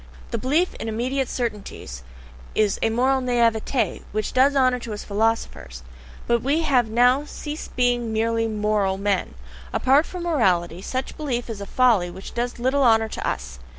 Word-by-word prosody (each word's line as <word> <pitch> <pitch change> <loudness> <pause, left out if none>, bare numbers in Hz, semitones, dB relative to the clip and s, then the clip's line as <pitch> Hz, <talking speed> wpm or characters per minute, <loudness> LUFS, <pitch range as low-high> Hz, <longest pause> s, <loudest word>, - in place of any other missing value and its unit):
The 230 - -2
belief 300 +10 +1
in 225 - -4
"immediate 250 +4 -1
certainties" 210 - -5 0.5
is 210 -2 +2
a 225 - +2
MORAL 260 +4 +2
NAIVETE 240 0 +1
which 215 0 -2
does 275 +2 +4
honour 255 -2 +3
to 230 -2 -6
us 205 - -6
philosophers; 205 - -2 0.4
but 235 -1 +2
we 290 +6 +1
have 255 -7 +2
now 245 +4 +4
to 295 - -11
cease 300 +1 -6
being 245 -2 0
"MERELY 225 +1 +1
moral" 210 -3 0
men! 200 - -1 0.4
Apart 275 +5 +3
from 360 -2 -6
morality, 185 - +1
such 260 +6 -4
belief 245 -6 -3
is 205 -3 -7
a 200 - -6
folly 230 -9 +3
which 190 +2 -10
does 240 +1 -2
little 260 +4 +1
honour 225 -3 +4
to - - -4
us! 65 +1 -4
235 Hz, 170 wpm, -23 LUFS, 210-260 Hz, 0.5 s, does